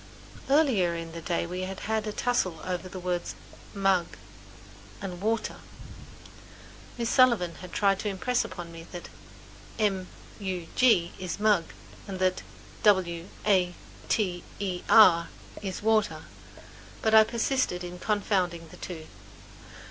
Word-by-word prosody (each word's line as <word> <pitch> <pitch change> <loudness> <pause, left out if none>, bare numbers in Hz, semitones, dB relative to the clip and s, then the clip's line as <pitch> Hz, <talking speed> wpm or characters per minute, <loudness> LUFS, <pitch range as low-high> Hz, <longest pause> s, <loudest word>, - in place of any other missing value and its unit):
Earlier 250 - +3
in 165 0 -6
the 165 0 -7
day 170 0 -1
we 180 +2 -4
had 190 +1 -5
had 220 0 -1
a - - -1
tussle 200 -8 0
over 185 0 -3
the 185 - -8
words 180 -1 -2 0.4
"m 195 -1 -5
u 190 -3 +5
g" - - -13 0.8
and 180 -3 -6
"w 220 +4 +2
a - - -5
t - - -6
e - - -12
r." - - -15 1.4
Miss 235 -1 -1
Sullivan 235 -9 +4
had 180 -1 -9
tried 195 -1 +2
to 210 - -2
impress 240 +6 0
it - - -8
upon 175 -2 -7
me 165 0 -10
that 175 - -7 0.7
"m 195 -4 0 0.3
u 185 -4 -3
g" 205 -9 +4
is 185 -1 -4
mug 205 -5 +3 0.4
and 195 -2 -5
that 185 0 +1 0.4
"w 180 -4 +3 0.2
a 185 -4 +3 0.3
t 180 -5 0 0.2
e 185 -3 -2
r" 170 -6 +7 0.3
is 195 -1 -5
water, 215 -1 +2 0.8
but 220 - +2
I 220 0 +9
persisted 230 -5 0
in 180 0 -7
confounding 185 -5 0
the - - -13
two. 160 -4 -7
185 Hz, 155 wpm, -28 LUFS, 175-215 Hz, 1.4 s, I